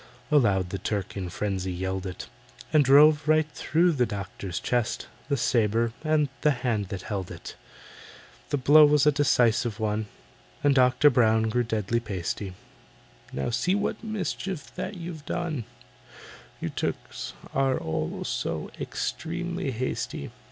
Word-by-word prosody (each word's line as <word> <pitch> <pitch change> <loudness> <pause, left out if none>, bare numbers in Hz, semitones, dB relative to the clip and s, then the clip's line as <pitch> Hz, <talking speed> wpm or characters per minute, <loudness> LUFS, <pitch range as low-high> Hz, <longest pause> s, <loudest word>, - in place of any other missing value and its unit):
Aloud 100 -11 +3
the 100 - -3
Turk 100 -4 -3
in 95 -3 -4
frenzy 95 +1 -2
yelled 95 +1 -3
it, 90 -1 -6 0.5
And 155 -2 +6
drove 145 +3 +6
right 155 0 +4
through 175 +4 +2
the 125 -6 +1
doctor's 100 -3 -5
chest 120 -2 -1 0.2
The 140 - +1
sabre 115 -1 +2
and 155 -2 +2
the 150 - +4 0.2
hand 110 -5 0
that 95 -2 -5
held 95 -4 -4
it. 85 - -9 0.9
The 145 - +1
blow 145 +4 +7
was 150 -1 +5
a 150 - +6
decisive 120 -5 +2
one, 110 0 -1 0.6
And 145 -1 +5
DOCTOR 130 +2 +5
BROWN 110 -2 +3
grew 125 +3 +1
deadly 110 -1 0
pasty, 95 -3 -4 0.8
"Now 70 - -2
see 130 +11 +1
the 205 +1 0
mischief 190 - -4
that 200 - -5
you've 170 -3 -7
done— 160 -9 -2 0.9
You - - -3
Turks - - -4 0.2
are 135 -1 +2 0.4
so - - -3
extremely 175 -1 -3
hasty. 125 - -3
120 Hz, 135 wpm, -27 LUFS, 105-150 Hz, 0.9 s, blow